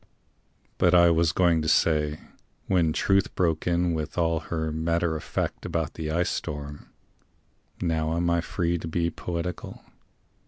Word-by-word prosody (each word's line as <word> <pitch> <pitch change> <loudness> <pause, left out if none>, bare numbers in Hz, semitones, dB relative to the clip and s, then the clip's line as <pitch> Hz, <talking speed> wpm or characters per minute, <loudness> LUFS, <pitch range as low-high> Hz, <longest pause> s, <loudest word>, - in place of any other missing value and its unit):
But 90 0 +4
I 85 -1 +7
was 85 0 +3
going 85 -3 +3
to 80 - -3
say 75 -1 +2 0.5
when 85 -4 +2
Truth 95 +4 +1
broke 85 -3 0
in 85 0 +1
With 80 +1 -4
all 85 -2 +2
her 80 0 -3
matter 85 +1 0
of 80 - -5
fact - - -3
about 80 -2 -2
the 80 -1 -5
ice 85 +3 0
storm 75 0 -5 0.9
(Now 80 -1 0
am 85 0 0
I 85 0 +2
free 85 0 -1
to 80 - -6
be 85 +1 0
poetical?) 90 +1 -5
85 Hz, 155 wpm, -26 LUFS, 80-85 Hz, 0.9 s, I